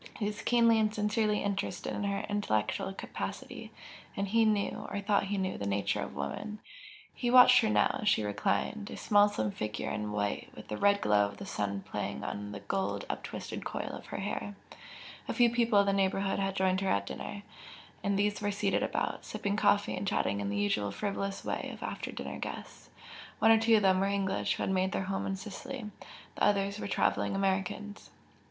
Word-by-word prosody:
He 210 - -2
was 210 0 -3
keenly 230 -2 +4
and 215 -1 +2
sincerely 210 0 +1
interested 195 -3 -2
in 205 - -2
her 200 0 -1
intellectual 195 - 0
capacity, 195 - -6 0.5
and 200 0 0
he 225 +3 +3
knew, 210 -2 0
or - - -3
thought 200 0 +2
he 200 +1 -2
knew, 190 -1 -2
the 100 - -3
nature 100 0 0
of - - -6
woman. 70 - -4 0.6
He 240 - -2
watched 250 0 +8
her 220 - +1
now - - +2
as 210 - +3
she 110 - +3
reclined, 105 - -1
a - - -7
small 205 0 +5
slim 110 - -1
figure 105 +1 -3
in 105 0 -3
white, 105 -1 -2
with - - -11
the 105 - -3
red 200 0 +3
glow 105 -1 +4
of 100 0 -10
the - - -7
sun 100 -1 -2
playing 70 - -4
on 105 0 -4
the 100 0 -7
gold 100 0 -2
uptwisted - - -6
coil - - -4
of - - -8
her - - -5
hair, 205 0 -4 0.7
a - - -2
few 240 -2 +5
people 235 -2 +3
of 200 - +6
the 200 - +2
neighbourhood 195 0 +1
had 195 -1 -1
joined 190 0 +2
her 195 - 0
at 100 0 +1
dinner, 205 - -6 0.6
and 200 -1 +1
these 205 +1 +1
were 205 - 0
seated 205 0 0
about, - - -1
sipping 200 0 -2
coffee 205 -1 +3
and 200 - -4
chatting 100 - 0
in 100 - -2
the 100 - -2
usual 100 0 +1
frivolous 195 - -3
way - - -2
of - - -9
after - - -4
dinner - - -6
guests - - -7 0.5
one 225 - +5
or 225 - +7
two 225 0 +5
of 210 - +3
them 190 -1 +4
were 195 - +2
English 195 -1 0
who - - -3
had - - 0
made 190 0 +1
their - - 0
home 195 +1 -2
in 195 - -1
Sicily, 210 +4 -7 0.4
the - - -3
others 200 0 +2
were - - -4
travelling 195 - +1
Americans. 195 +1 -2
200 Hz, 205 wpm, -31 LUFS, -, 0.7 s, watched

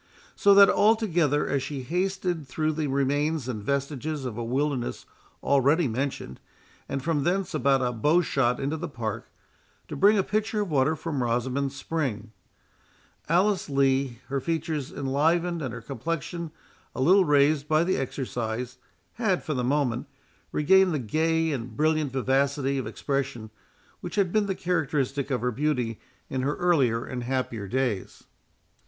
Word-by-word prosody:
So 200 -1 +5
that, 200 0 +9
altogether, 175 -10 +2
as 140 -1 0
she 135 0 -5
hasted 180 0 -2
through 155 +3 -1
the 155 -1 -2
remains 140 +1 0
and 115 -5 -4
vestiges 140 +3 -2
of 120 -4 -4
a 120 - -4
wilderness 130 +1 -2 0.4
already 140 +4 +3
mentioned, 125 - -4 0.5
and 135 - -3
from 155 -3 0
thence 185 +3 0
about 140 -3 +2
a 125 - +1
bow 150 +10 +2
shot 125 -5 +1
into 140 +4 -2
the 170 +1 -5
Park, 115 -6 -5 0.6
to - - -6
bring 210 +2 +5
a 195 - +3
pitcher 215 +1 -1
of 200 -5 -3
water 145 +2 +2
from 155 -4 -3
Rosamond's 125 +3 -1
spring, 130 -9 -3 1.0
Alice 185 +2 +2
Lee, 135 -2 +1
her 140 0 -2
features 160 -2 -2
enlivened 165 +5 0
and 130 -5 -3
her 115 - -7
complexion 165 +7 -4 0.5
a - - -5
little 185 +9 +5
raised 145 -1 +3
by 155 +1 +3
the 185 -2 0
exercise, 125 -2 -4 0.4
had, 195 -6 +1
for 155 - -2
the 125 -3 -1
moment, 125 -2 0 0.4
regained 190 +3 +4
the - - +1
gay 160 +6 0
and 120 -4 -5
brilliant 155 -2 +1
vivacity 135 +1 +1
of 130 - -4
expression 135 -6 -3 0.5
which 175 0 -7
had 195 -4 +2
been 215 0 +2
the 195 - -1
characteristic 145 -6 -1
of 130 -3 -1
her 125 0 0
beauty 125 -4 -1 0.3
in 130 - -2
her 140 +3 0
earlier 135 -10 +2
and 125 -1 -5
happier 120 -5 -2
days. 120 -3 -2
140 Hz, 155 wpm, -26 LUFS, 130-165 Hz, 1.0 s, that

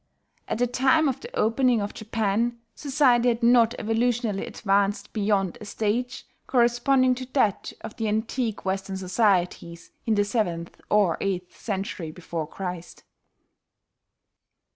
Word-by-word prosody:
At - - -2
the 245 - +2
time 265 +5 +3
of 265 - -1
the 470 - -9
opening 240 +1 +3
of 205 0 -3
Japan, 220 +2 -1 0.2
society 265 -4 +3
had 235 0 +1
not 235 -1 +5
evolutionally 225 -2 0
advanced 200 0 0
beyond 200 -4 0
a - - -7
stage 230 +4 -2 0.2
corresponding 255 +1 +3
to 255 0 -6
that 215 -8 +1
of - - -8
the 225 - -1
antique 220 +1 -2
Western 190 0 -2
societies 180 -3 0 0.2
in 220 - +3
the 205 0 +2
seventh 175 -6 -2
or 200 -6 +3
eighth 180 -2 -3
century 195 -5 -4
before 165 -1 -5
Christ. 180 0 -7
220 Hz, 130 wpm, -25 LUFS, 195-240 Hz, 0.2 s, not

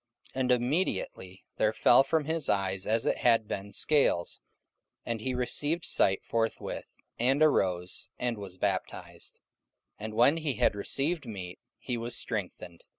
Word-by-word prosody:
44:009:018 130 - -2
And 125 -1 +2
immediately 120 - -1
there 110 0 +2
fell 120 +4 +6
from 150 +2 0
his 160 -2 -1
eyes 95 -1 0
as 110 +1 +1
it - - +1
had 115 -3 +3
been 100 0 -5
scales: 140 - +1 0.6
and 115 -2 -3
he 130 +2 -2
received 145 +6 0
sight 95 0 +2
forthwith, 115 -1 -3 0.2
and 135 +5 +3
arose, 90 - +1
and 120 -1 -1
was 95 -2 -8
baptized. - - -4 0.6
44:009:019 105 - -6
And 110 - -5
when 130 +7 +5
he 155 -4 -1
had - - +3
received 140 +8 -2
meat, 95 -5 -7 0.2
he 125 -2 -4
was 115 +1 -1
strengthened. 90 -6 -4
115 Hz, 150 wpm, -29 LUFS, 100-135 Hz, 0.6 s, fell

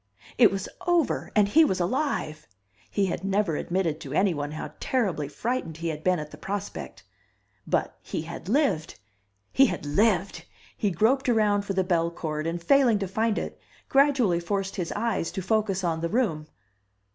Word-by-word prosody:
it 230 - +8
was 195 -1 -3 0.2
over! 345 -4 +1
And 210 -2 +5
he 320 +11 +6
was 190 -12 +1
alive! 175 - -1 0.4
He 200 - +1
had 185 -1 -3
never 195 -4 +1
admitted 175 -2 -1
to 135 - -7
anyone 160 -5 +1
how 155 - -6
terribly 190 - 0
frightened 215 - -3
he 165 0 -3
had 155 -1 -5
been 185 -1 +3
at 150 -1 -6
the - - -12
prospect. 200 0 -5 0.6
But - - 0
he 155 - -4
had 165 +2 -8
lived 250 - +1 0.5
he 270 0 +6
had 180 -7 -4
lived! 195 +4 +1 0.3
He 205 - 0
groped 230 - +2
around 210 -3 +2
for 195 - -2
the 190 0 +1
bellcord, 165 -3 -1
and 170 +1 -2
failing 245 +4 +4
to 195 -1 -3
find 220 +3 0
it, - - -4 0.3
gradually 270 -10 +3
forced 195 +3 -2
his 180 -4 -3
eyes 215 -6 -1
to 190 - -3
focus 200 -1 0
on 165 -2 -1
the 170 - -1
room. 180 -10 0
195 Hz, 170 wpm, -26 LUFS, 165-220 Hz, 0.6 s, it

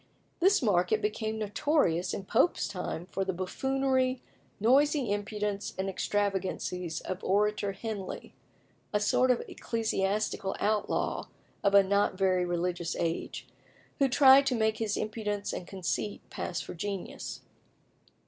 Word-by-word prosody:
This 380 -1 +4
market 190 -1 +3
became 220 +1 -2
notorious 205 - +1
in 195 - -4
Pope's 260 - +2
time 180 -3 -4
for 195 - -1
the 190 0 -2
buffoonery, 260 +7 0 0.4
noisy 270 +2 +3
impudence, 205 0 -2
and 190 +1 -1
extravagances 190 -3 -2
of 185 - -5
Orator 205 0 +1
Henley, 200 -1 -6 0.6
a 210 - +2
sort 230 +5 +3
of 250 - +2
ecclesiastical 210 -3 -1
outlaw 210 0 0 0.4
of 200 0 +3
a 200 - +8
not 200 0 +1
very 185 -2 +2
religious 175 -1 -2
age, 165 -1 -3 0.5
who 275 -1 +4
tried 270 +1 +7
to 255 - +2
make 220 -1 +1
his 215 -2 -1
impudence 210 -1 -3
and 180 - -5
conceit 195 +2 -3
pass - - -3
for - - -7
genius. 195 +2 -5
205 Hz, 130 wpm, -30 LUFS, 190-225 Hz, 0.6 s, a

